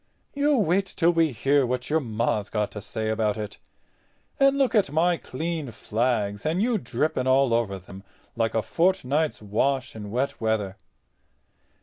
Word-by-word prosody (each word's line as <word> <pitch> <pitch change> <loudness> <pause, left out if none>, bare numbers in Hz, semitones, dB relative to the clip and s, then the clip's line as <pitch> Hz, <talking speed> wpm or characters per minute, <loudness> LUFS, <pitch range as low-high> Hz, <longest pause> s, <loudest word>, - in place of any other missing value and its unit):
You 285 0 +2
wait 195 -1 +2
till 175 -2 +2
we 165 -3 +2
hear 135 +4 +2
what 125 +2 -2
your 160 - +4
Ma's 110 -5 -1
got 105 -1 -1
to 105 - -7
say 110 +1 -3
about 110 -1 0
it. 105 -1 -6 0.8
And 275 0 +4
look 265 -4 +2
at 205 - +3
my 170 +3 +3
clean 160 0 -4
flags 110 -2 -1
and 160 +4 0
you 230 +1 +1
dripping 130 -4 -1
all 130 -2 +4
over 105 -5 0
'em 95 0 -10 0.3
like 115 -1 0
a 110 - +1
fortnight's 160 - 0
wash 130 +6 0
in 105 -2 -7
wet 125 +5 -2
weather." 110 -4 0
130 Hz, 160 wpm, -25 LUFS, 110-165 Hz, 0.8 s, your